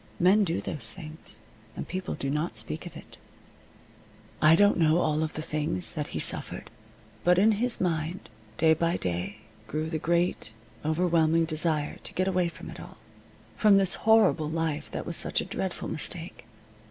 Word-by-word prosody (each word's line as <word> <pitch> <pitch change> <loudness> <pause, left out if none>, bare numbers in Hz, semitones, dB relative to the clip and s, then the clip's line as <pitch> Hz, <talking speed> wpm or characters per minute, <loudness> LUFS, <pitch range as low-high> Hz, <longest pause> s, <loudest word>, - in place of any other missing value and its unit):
Men 195 +4 +5
do 170 -3 -1
those 120 -8 -2
things, 155 - -9 0.4
and - - -5
people 185 +1 -4
do 135 - -3
not 150 -5 -2
speak 95 -8 -3
of - - -10
it. - - -13 1.2
I 155 +1 +7
don't 205 0 +4
know 160 0 +4
all 155 -3 +1
the 160 - +1 0.2
things 155 +3 -1
that 150 -3 -3
he - - -4
suffered. - - -1 0.5
But 180 0 +4
in 210 +4 +5
his 230 +3 0
mind, 170 0 -2 0.3
day 160 -1 +5
by 170 +2 0
day, 95 +4 -3 0.3
grew 155 +6 -3
the 160 - -1
great, 170 -8 0 0.3
overwhelming 165 0 +2
desire 155 -2 0
to - - -9
get 185 +1 0
away 180 -2 +2
from 170 - -9
it - - -10
all - - -11 0.6
from 210 -2 +5
this 190 -1 +3 0.2
horrible 215 -9 +5
life 160 -2 -2
that - - -5
was 170 - -1
such - - +1
a - - -2
dreadful 190 -1 -4
mistake. 165 -5 -3
165 Hz, 170 wpm, -28 LUFS, 155-180 Hz, 1.2 s, I